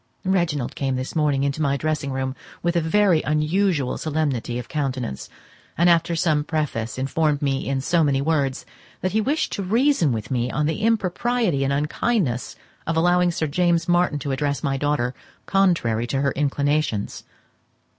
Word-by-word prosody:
Reginald 170 -9 0
came 135 -2 -1
this 130 +4 -4
morning 145 -3 +2
into 140 +2 -1
my 140 -2 +1
dressing 150 -1 -2
room 130 0 -2 0.3
with 170 0 0
a 170 - +3
very 175 0 +3
unusual 155 -1 0
solemnity 145 -6 -1
of 125 - -6
countenance, 130 - -3 0.5
and 175 +1 +5
after 170 0 +2
some 155 -3 +1
preface 150 -8 -2
informed 145 +2 0
me 135 -1 -1
in 135 -1 0
so 165 +4 +2
many 140 -2 +2
words 140 -3 0 0.4
that 185 - 0
he 220 - +2
wished 285 +8 0
to 200 - -3
reason 220 - +2
with 110 0 -4
me 125 -1 0
on 150 +3 0
the 160 +7 -1
impropriety 220 - +1
and 135 - 0
unkindness 150 - -1 0.3
of 165 0 0
allowing 175 +1 +3
Sir 165 -2 -1
James 170 +2 +1
Martin 175 -3 +2
to 140 0 -4
address 140 +1 -1
my 135 -1 0
daughter 135 -3 0 0.3
contrary 165 - +2
to 135 +2 -1
her 140 0 +1
inclinations. 145 -5 -1
150 Hz, 165 wpm, -23 LUFS, 135-175 Hz, 0.5 s, and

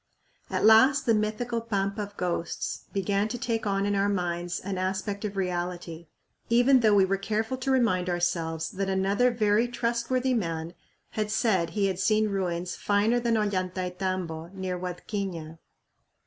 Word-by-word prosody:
At - - 0
last 260 +6 +6
the 230 - +4
mythical 220 +2 -1
"Pampa 200 -2 -1
of 205 0 -7
Ghosts" 175 -2 -3
began 200 +1 0
to 235 +3 -4
take 230 -2 -2
on 195 0 +1
in 205 - +1
our 200 0 +2
minds 175 -2 -2
an 190 -1 -4
aspect 190 +2 -2
of 200 -1 -4
reality, 175 -2 -3 0.4
even 245 +3 +5
though 215 -3 +4
we 195 -1 +6
were 195 +1 0
careful 220 +4 -1
to 260 +1 -3
remind 220 -9 +2
ourselves 170 -2 -1
that 195 0 -2
another 195 +6 +2
very 220 0 +2
trustworthy 240 +2 0
man 165 -6 -2 0.4
had 215 -1 -2
said 210 -6 +1
he 200 - +3
had 190 -2 -1
seen 215 +1 +2
ruins 180 -3 -2
"finer 210 +4 +2
than 235 -1 +1
Ollantaytambo" 185 -4 -2
near 185 -1 -3
Huadquiña. 175 -3 -5
200 Hz, 155 wpm, -27 LUFS, 180-220 Hz, 0.4 s, last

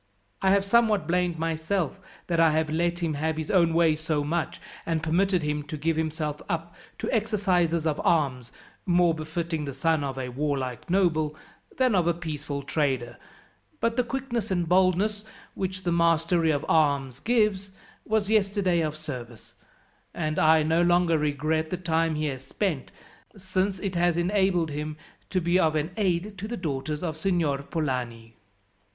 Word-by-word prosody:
I 190 - +3
have 195 0 +3
somewhat 215 -4 +3
blamed 175 -1 +1
myself 165 +4 -1 0.3
that 170 -2 0
I 165 -2 +5
have 155 0 0
let 170 +2 0
him 160 -2 0
have 155 +2 -1
his 160 -1 -3
own 170 -4 +4
way 165 -2 +4
so 155 -1 -1
much, 165 +3 -2 0.2
and 165 -2 -1
permitted 180 +2 +2
him 150 0 -1
to 155 - -5
give 160 +2 0
himself 155 -1 -2
up 170 -1 -3 0.2
to - - -3
exercises 190 -7 +1
of 155 -2 0
arms, 140 - +1 0.4
more 175 -1 +4
befitting 160 0 -3
the 140 -2 -6
son 160 +1 +1
of 135 -1 -4
a 130 -1 -3
warlike 130 -1 -3
noble 160 -5 +2 0.4
than 255 -3 +3
of 180 -3 +2
a 170 - +2
peaceful 150 -4 -5
trader; 130 -5 -1 0.6
but 230 0 0
the 250 - +2
quickness 245 -2 -3
and 175 -3 0
boldness, 190 +4 +2 0.3
which 185 -1 -4
the 175 - 0
mastery 170 0 +2
of 145 -1 0
arms 140 -5 +2
gives, 210 -1 +1 0.3
was 220 -2 0
yesterday 200 -4 +2
of 155 -1 -2
service, 125 -7 -8 0.6
and 155 -2 -1
I 155 0 +5
no 160 +2 +2
longer 175 -2 +3
regret 155 +2 0
the 180 - -2
time 165 -2 0
he 155 0 -1
has 135 -3 -4
spent, 165 -4 -2 0.5
since 190 +1 -1
it 195 -1 -3
has 175 -1 +2
enabled 180 -2 +1
him 150 +1 -4 0.3
to 185 - +1
be 175 +1 +2
of 155 -3 +2 0.2
aid 195 0 -1
to 205 - -4
the 240 - -4
daughters 150 -2 -3
of 160 -3 -3
Signor 165 -6 +1
Polani." 125 -7 -3
165 Hz, 165 wpm, -26 LUFS, 150-185 Hz, 0.6 s, I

